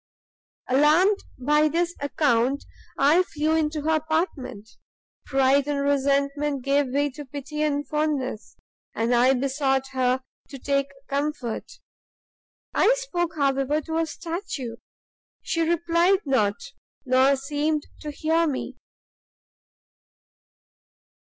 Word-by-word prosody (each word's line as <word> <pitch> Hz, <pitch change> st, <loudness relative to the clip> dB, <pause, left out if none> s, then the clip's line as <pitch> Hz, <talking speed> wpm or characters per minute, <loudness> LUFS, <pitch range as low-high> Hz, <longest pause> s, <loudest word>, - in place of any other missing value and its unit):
"Alarmed 310 Hz, +10 st, +4 dB, 0.2 s
by 300 Hz, +4 st, +3 dB
this 340 Hz, +3 st, 0 dB
account, 280 Hz, -2 st, +1 dB, 0.3 s
I 305 Hz, +6 st, +5 dB
flew 315 Hz, -3 st, -1 dB
into 305 Hz, -1 st, 0 dB
her 320 Hz, +1 st, +2 dB
apartment; 305 Hz, -, -3 dB, 0.6 s
pride 270 Hz, +1 st, +3 dB
and 290 Hz, -1 st, -1 dB
resentment 280 Hz, 0 st, 0 dB
gave 280 Hz, +1 st, +2 dB
way 285 Hz, +3 st, 0 dB
to 295 Hz, +3 st, -8 dB
pity 290 Hz, +2 st, -6 dB
and 290 Hz, -1 st, 0 dB
fondness, 300 Hz, -7 st, -2 dB, 0.4 s
and 230 Hz, +2 st, +1 dB
I 250 Hz, +3 st, +4 dB
besought 270 Hz, 0 st, 0 dB
her 255 Hz, 0 st, +1 dB, 0.3 s
to 275 Hz, -, -8 dB
take 275 Hz, +1 st, 0 dB, 0.2 s
comfort. 280 Hz, -, -3 dB, 1.0 s
I 460 Hz, -, +4 dB
spoke, 350 Hz, -10 st, -2 dB
however, 275 Hz, +1 st, +1 dB
to 320 Hz, +2 st, -4 dB
a 330 Hz, -, 0 dB
statue, 325 Hz, -, -5 dB, 0.7 s
she 330 Hz, -, -1 dB
replied 340 Hz, +3 st, +2 dB
not, 215 Hz, -7 st, +2 dB, 0.5 s
nor 260 Hz, +2 st, +4 dB
seemed 295 Hz, +2 st, -1 dB, 0.2 s
to 300 Hz, -, -6 dB
hear 320 Hz, +3 st, +1 dB
me. 275 Hz, -4 st, -4 dB
285 Hz, 110 wpm, -25 LUFS, 270-315 Hz, 1.0 s, I